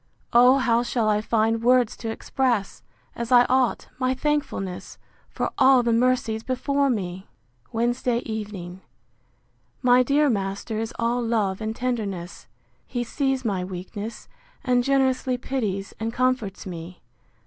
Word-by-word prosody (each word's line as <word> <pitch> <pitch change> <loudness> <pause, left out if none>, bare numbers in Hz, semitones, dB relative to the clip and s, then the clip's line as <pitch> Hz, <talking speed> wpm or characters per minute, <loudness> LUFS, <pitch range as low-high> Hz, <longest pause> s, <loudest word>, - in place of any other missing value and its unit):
O 250 +3 +7
how 235 -3 +2
shall 235 -2 0
I 210 0 +2
find 225 +1 +1
words 245 -1 +3
to 230 - -5
express, 235 -2 -1 0.3
as 235 +1 -5
I 245 -1 +7
ought, 255 -2 +1
my 255 0 +1
thankfulness, 270 -11 -2 0.3
for - - -3
all 265 -2 +6
the 235 -1 +2
mercies 230 -2 +1
before 275 +3 0
me! 190 -5 -3 0.4
Wednesday 240 +1 0
evening. 200 -5 -6 1.0
My 250 0 +6
dear 285 +4 +3
master 200 -1 -2
is 225 0 -3
all 235 +1 0
love 220 -4 0
and 220 0 -3
tenderness. 205 -9 -4 0.4
He 245 -1 -2
sees 265 +1 -1
my 195 -4 0
weakness, 195 +4 -7 0.4
and 250 -2 +2
generously 260 -1 +1
pities 215 -7 -3
and 225 +1 -2
comforts 255 -5 -1
me! 175 -1 -8
235 Hz, 135 wpm, -24 LUFS, 210-255 Hz, 1.0 s, O